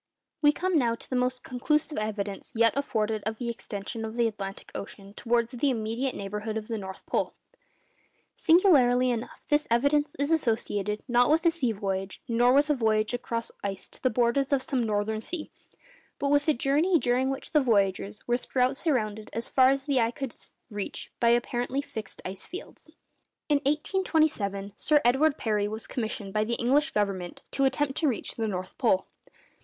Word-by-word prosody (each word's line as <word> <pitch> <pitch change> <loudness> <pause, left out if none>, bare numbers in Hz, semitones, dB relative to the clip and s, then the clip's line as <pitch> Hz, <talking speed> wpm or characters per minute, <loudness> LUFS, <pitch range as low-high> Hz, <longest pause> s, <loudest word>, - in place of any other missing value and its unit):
We 295 -1 +6
come 360 +1 +1
now 235 -3 +1
to - - -11
the 260 - -3
most 250 0 0
conclusive 300 +4 0
evidence 205 -2 -4
yet 230 -1 +4
afforded 220 -6 -1
of 220 0 -3
the 240 0 -3
extension 225 0 -5
of 220 0 -5
the 235 -1 +3
Atlantic 200 -3 -6
Ocean 200 0 -8
towards 235 +1 0
the 255 +3 +1
immediate 235 +2 -1
neighbourhood 210 +2 -4
of 215 -1 -5
the 225 -2 -3
North 190 -1 -8
Pole. - - -1 1.0
Singularly 260 -8 +5
enough, 235 -1 -5
this 295 0 +2
evidence 285 +5 +2
is 285 +3 0
associated 215 - 0
not 245 0 +4
with 320 +3 +3
a 335 - +6
sea 275 -8 +1
voyage, 195 -2 -3
nor 240 +1 +4
with 290 +3 +4
a - - +5
voyage 220 -3 +1
across 230 -1 -3
ice 195 -1 -3
to - - -13
the 255 - +3
borders 245 +4 +1
of 270 -2 +2
some 265 -4 0
northern 215 +1 -1
sea, 330 +4 -6 0.7
but 280 0 0
with 290 +1 +3
a 310 - +5
journey 295 +9 +3
during 255 -1 +1
which 270 0 -5
the 300 - +4
voyagers 205 -3 0
were 240 0 +2
throughout 255 +1 0
surrounded 220 -9 -1
as 230 +1 -3
far 260 -1 +5
as 275 0 +1
the 275 -2 +1
eye 230 - +2
could 255 0 -6 0.4
reach 205 -1 -5
by 235 - +4
apparently 240 +2 +1
fixed 220 -6 -7
ice 190 +1 -6
fields. 360 -3 -10 0.6
In 295 - +5
1827 295 - 0
Sir 300 -1 +3
Edward 275 +5 +4
Parry 210 -3 0
was 220 +1 -5
commissioned 220 -4 -4
by 215 - +2
the 235 +2 -1
English 280 +6 +2
Government 195 -4 -2
to 275 - +2
attempt 270 0 0
to 315 - +2
reach 245 -6 -1
the 225 -1 -2
North 185 -2 -4
Pole. 215 -7 +3
240 Hz, 180 wpm, -28 LUFS, 215-280 Hz, 1.0 s, We